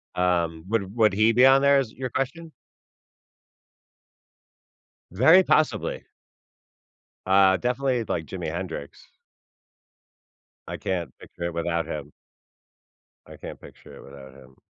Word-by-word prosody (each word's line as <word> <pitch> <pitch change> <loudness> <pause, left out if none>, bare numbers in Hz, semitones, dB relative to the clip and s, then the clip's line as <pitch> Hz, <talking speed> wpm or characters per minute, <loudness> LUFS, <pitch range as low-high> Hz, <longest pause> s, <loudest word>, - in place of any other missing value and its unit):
Um, 85 -2 -1
would 100 -2 -2
would 110 -4 +3
he 110 +3 +3
be 125 +3 +5
on 135 +1 +6
there 140 0 +4
is 125 -5 -3
your 130 0 -5
question? 135 +7 -4 2.6
Very 160 - +5
possibly. 155 -3 0 1.2
Uh, 95 0 +4
definitely, 125 +1 -1
like, 85 -6 -4
Jimi 90 -2 -6
Hendrix. 85 -4 -7 1.6
I - - -6
can't 90 -3 -4
picture 85 - -11
it 85 -1 -3
without 85 -1 -2
him. 75 -2 -7 1.1
I - - -13
can't - - -9
picture - - -15
it - - -13
without 70 -1 -13
him. 65 -1 -18
95 Hz, 120 wpm, -24 LUFS, 85-125 Hz, 2.6 s, on